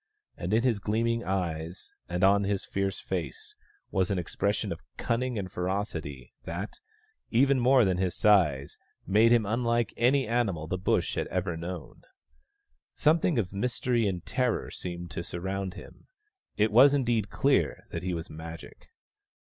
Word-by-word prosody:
And 90 Hz, +2 st, -4 dB
in 110 Hz, +2 st, +3 dB
his 120 Hz, -5 st, +2 dB
gleaming 115 Hz, +3 st, 0 dB
eyes, 85 Hz, -3 st, -3 dB, 0.2 s
and 90 Hz, +2 st, -1 dB
on 100 Hz, +1 st, +5 dB
his 100 Hz, -1 st, -1 dB
fierce 100 Hz, -1 st, -2 dB
face, 90 Hz, -3 st, -5 dB, 0.4 s
was 95 Hz, -1 st, +1 dB
an 100 Hz, -, 0 dB
expression 100 Hz, +4 st, -1 dB
of -, -, -5 dB, 0.2 s
cunning 125 Hz, +1 st, -1 dB
and 95 Hz, -3 st, -4 dB
ferocity 85 Hz, -, -4 dB
that, 90 Hz, +6 st, -6 dB, 0.5 s
even 135 Hz, +3 st, +4 dB
more 125 Hz, -1 st, +5 dB
than 95 Hz, -2 st, +1 dB
his 90 Hz, -1 st, -1 dB
size, 75 Hz, -10 st, +3 dB, 0.3 s
made 110 Hz, +4 st, +4 dB
him 120 Hz, -3 st, +4 dB
unlike 115 Hz, +1 st, 0 dB
any 130 Hz, +2 st, +3 dB
animal 110 Hz, -9 st, 0 dB
the 90 Hz, +3 st, -3 dB
Bush 95 Hz, -, +1 dB
had -, -, -2 dB
ever 90 Hz, -1 st, -2 dB
known. 85 Hz, 0 st, -7 dB, 0.9 s
Something 160 Hz, 0 st, +3 dB
of 95 Hz, -5 st, -1 dB
mystery 120 Hz, +1 st, 0 dB
and 90 Hz, -3 st, -3 dB
terror 125 Hz, -3 st, -1 dB
seemed 85 Hz, -2 st, -6 dB
to 80 Hz, -, -4 dB
surround 95 Hz, +2 st, -4 dB
him; -, -, -13 dB, 0.5 s
it 105 Hz, +1 st, +3 dB
was 135 Hz, +6 st, +7 dB
indeed 120 Hz, -6 st, +1 dB
clear -, -, +1 dB
that -, -, -4 dB
he 90 Hz, -1 st, -2 dB
was 80 Hz, 0 st, -5 dB
Magic. 80 Hz, +1 st, -10 dB
100 Hz, 155 wpm, -28 LUFS, 90-115 Hz, 0.9 s, was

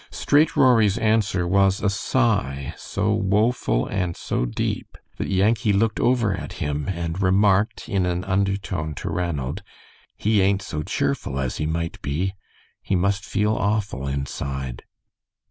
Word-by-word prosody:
Straight 150 Hz, +2 st, +2 dB
Rory's 115 Hz, -7 st, +4 dB
answer 110 Hz, -5 st, +1 dB
was 95 Hz, +1 st, +3 dB
a -, -, 0 dB
sigh 100 Hz, -, 0 dB
so 105 Hz, +2 st, -1 dB
woeful 105 Hz, -, +1 dB
and 90 Hz, -4 st, -2 dB
so -, -, -1 dB
deep -, -, -3 dB, 0.2 s
that -, -, -3 dB
Yankee 105 Hz, +3 st, +2 dB
looked 110 Hz, +2 st, +1 dB
over 120 Hz, -5 st, +2 dB
at 95 Hz, -, -7 dB
him 75 Hz, 0 st, -3 dB
and 85 Hz, 0 st, -3 dB
remarked 100 Hz, +3 st, +2 dB
in 95 Hz, -5 st, 0 dB
an 90 Hz, 0 st, -1 dB
undertone 95 Hz, -5 st, -1 dB
to -, -, -4 dB
Ranald, 80 Hz, -1 st, -2 dB, 0.6 s
"He 105 Hz, -1 st, +2 dB
ain't 95 Hz, 0 st, +2 dB
so 75 Hz, -5 st, -4 dB
cheerful 70 Hz, -2 st, -2 dB
as 65 Hz, -2 st, -2 dB
he 75 Hz, -, -1 dB
might 85 Hz, +1 st, -3 dB
be. 80 Hz, +7 st, -1 dB, 0.5 s
He 95 Hz, -, -1 dB
must 100 Hz, +2 st, +1 dB
feel 105 Hz, +2 st, 0 dB
awful 100 Hz, -11 st, -1 dB
inside." 70 Hz, -2 st, -4 dB
95 Hz, 145 wpm, -23 LUFS, 75-105 Hz, 0.6 s, Rory's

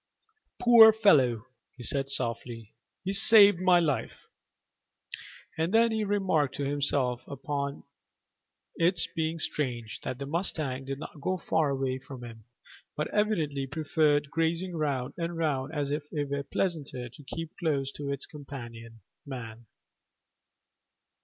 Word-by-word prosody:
"Poor 235 Hz, -2 st, +9 dB
fellow," 135 Hz, -, +3 dB, 0.3 s
he 125 Hz, -, -9 dB
said 135 Hz, +3 st, -2 dB
softly; 115 Hz, -3 st, -4 dB, 0.3 s
"he 195 Hz, +1 st, -2 dB
saved 205 Hz, -2 st, +7 dB
my 180 Hz, -1 st, +5 dB
life." 145 Hz, -9 st, -2 dB, 1.3 s
And 165 Hz, +2 st, 0 dB
then 230 Hz, 0 st, +5 dB
he 220 Hz, -1 st, 0 dB
remarked 190 Hz, -9 st, +1 dB
to 140 Hz, -, -2 dB
himself 140 Hz, -3 st, 0 dB
upon 140 Hz, 0 st, -4 dB, 0.9 s
its 170 Hz, 0 st, +3 dB
being 160 Hz, 0 st, -3 dB
strange 125 Hz, -8 st, -2 dB
that 130 Hz, -, -4 dB
the 140 Hz, -, -5 dB
mustang 145 Hz, -4 st, -2 dB
did 135 Hz, 0 st, -4 dB
not 145 Hz, 0 st, -9 dB
go 185 Hz, +5 st, -1 dB
far 160 Hz, -3 st, 0 dB
away 135 Hz, -1 st, -1 dB
from 130 Hz, -1 st, -10 dB
him, 115 Hz, -2 st, -11 dB, 0.5 s
but 150 Hz, -, -1 dB
evidently 160 Hz, -11 st, 0 dB
preferred 145 Hz, 0 st, +1 dB
grazing 165 Hz, +2 st, -1 dB
round 140 Hz, -5 st, -2 dB
and 170 Hz, 0 st, -3 dB
round 145 Hz, -4 st, -1 dB
as 145 Hz, -3 st, -2 dB
if 150 Hz, 0 st, -4 dB
it 145 Hz, -2 st, -3 dB
were 140 Hz, 0 st, -1 dB
pleasanter 140 Hz, -4 st, -3 dB
to 135 Hz, +5 st, -15 dB
keep 160 Hz, +3 st, -7 dB
close 140 Hz, -5 st, 0 dB
to 145 Hz, 0 st, -6 dB
its 140 Hz, -1 st, -3 dB
companion, 120 Hz, -6 st, -10 dB, 0.2 s
man. 120 Hz, -4 st, -8 dB
145 Hz, 135 wpm, -28 LUFS, 130-165 Hz, 1.3 s, Poor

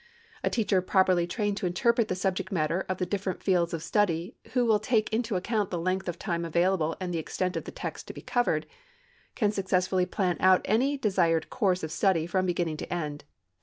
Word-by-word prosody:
A -, -, +2 dB
teacher 205 Hz, -5 st, +1 dB
properly 185 Hz, -2 st, +3 dB
trained 205 Hz, +2 st, -1 dB
to 190 Hz, -, -1 dB
interpret 235 Hz, +6 st, +2 dB
the 185 Hz, -, -1 dB
subject 190 Hz, 0 st, -2 dB
matter 170 Hz, +1 st, 0 dB
of 185 Hz, -, -1 dB
the 180 Hz, -, -1 dB
different 190 Hz, 0 st, -3 dB
fields 175 Hz, -3 st, +2 dB
of 165 Hz, -2 st, -4 dB
study 185 Hz, +1 st, 0 dB, 0.2 s
who 250 Hz, -2 st, +3 dB
will 220 Hz, -2 st, +4 dB
take 220 Hz, 0 st, 0 dB
into 225 Hz, -2 st, 0 dB
account 205 Hz, +2 st, 0 dB
the 175 Hz, -, -2 dB
length 185 Hz, +2 st, -1 dB
of 175 Hz, -, -4 dB
time 170 Hz, -3 st, -2 dB
available 170 Hz, -1 st, +1 dB
and 180 Hz, -2 st, -3 dB
the 165 Hz, -, 0 dB
extent 180 Hz, +3 st, -2 dB
of -, -, -3 dB
the -, -, -6 dB
text -, -, -6 dB
to -, -, -7 dB
be -, -, -9 dB
covered, 245 Hz, -1 st, +1 dB, 0.7 s
can 210 Hz, -4 st, +2 dB
successfully 185 Hz, -2 st, +1 dB
plan 180 Hz, -2 st, 0 dB
out 185 Hz, 0 st, +5 dB
any 265 Hz, +7 st, +2 dB
desired 175 Hz, -9 st, +1 dB
course 190 Hz, -7 st, +1 dB
of 160 Hz, -, -3 dB
study 170 Hz, -2 st, +2 dB
from 185 Hz, +2 st, 0 dB
beginning 170 Hz, -3 st, -1 dB
to 175 Hz, -, -7 dB
end. 150 Hz, -4 st, -3 dB
185 Hz, 205 wpm, -28 LUFS, 175-205 Hz, 0.7 s, out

